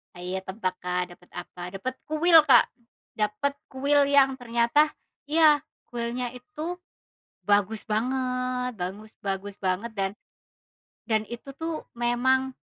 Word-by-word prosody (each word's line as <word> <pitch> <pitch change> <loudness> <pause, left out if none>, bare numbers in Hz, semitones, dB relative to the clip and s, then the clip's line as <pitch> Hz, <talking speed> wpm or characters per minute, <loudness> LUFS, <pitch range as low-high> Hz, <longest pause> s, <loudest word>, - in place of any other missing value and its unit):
Hayo 180 +2 -4
tebak, 190 -1 -2
Kak, 180 0 -1
dapet 180 0 -17
apa? 175 0 -8
Dapet 255 +7 -3
kuil, 325 +2 +6
Kak, - - +8 0.5
dapet 210 +6 0
kuil 280 +2 +2
yang 270 -2 +4
ternyata 240 +6 +3 0.4
iya 310 -1 +6 0.3
kuilnya 240 +1 -2
itu 310 +7 -6 0.7
bagus 205 +1 +2
banget, 250 +2 -1
bagus 205 +3 -6
bagus 195 0 -3
banget 190 +5 -1
dan 195 -2 0 1.0
dan 220 -1 +2
itu 240 +3 -7
tuh 325 0 -4
memang, 250 +2 +2
240 Hz, 120 wpm, -27 LUFS, 205-270 Hz, 1.0 s, Kak